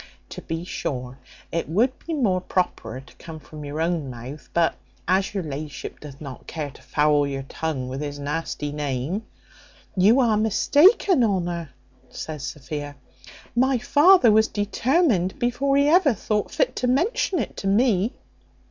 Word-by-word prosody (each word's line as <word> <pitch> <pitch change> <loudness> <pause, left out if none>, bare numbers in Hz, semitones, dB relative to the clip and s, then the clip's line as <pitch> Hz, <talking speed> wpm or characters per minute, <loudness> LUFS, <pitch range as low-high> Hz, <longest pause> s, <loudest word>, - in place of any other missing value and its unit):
To - - -8
be 165 +1 -4
sure, 130 -6 -4 0.3
it 165 -2 -2
would 230 +10 +2
be 330 - -1
more 195 -10 +1
properer 180 -8 -2
to 135 - -19
come 160 -1 -9
from 150 +1 -11
your 145 +2 -5
own 165 -4 -1
mouth; 125 +5 -9
but 170 -1 +2 0.3
as 190 +2 +1
your 195 - -1
la'ship 150 0 -6
doth 145 -2 -11
not 140 -4 -9
care 150 -3 -4
to - - -17
foul 150 -1 +2
your 135 -1 -4
tongue 135 -2 -4
with 130 +2 -5
his 145 -1 -4
nasty 145 0 -3
name 145 - -3 0.3
" - - -26
"You 230 +6 +6
are 230 -4 +3
mistaken, 290 - +4
Honour," 175 -6 -1 0.4
says 150 +3 -6
Sophia; 145 +2 -6 0.6
"my 260 +2 +3
father 290 - +6
was 220 +1 +5
determined 210 - +1
before 265 +3 +1
he 280 +1 +4
ever 310 -5 +4
thought 210 +1 -1
fit - - 0
to 250 - 0
mention 365 - +1
it 250 - -3
to 195 - -3
me." 210 0 +2
175 Hz, 160 wpm, -24 LUFS, 145-245 Hz, 0.6 s, You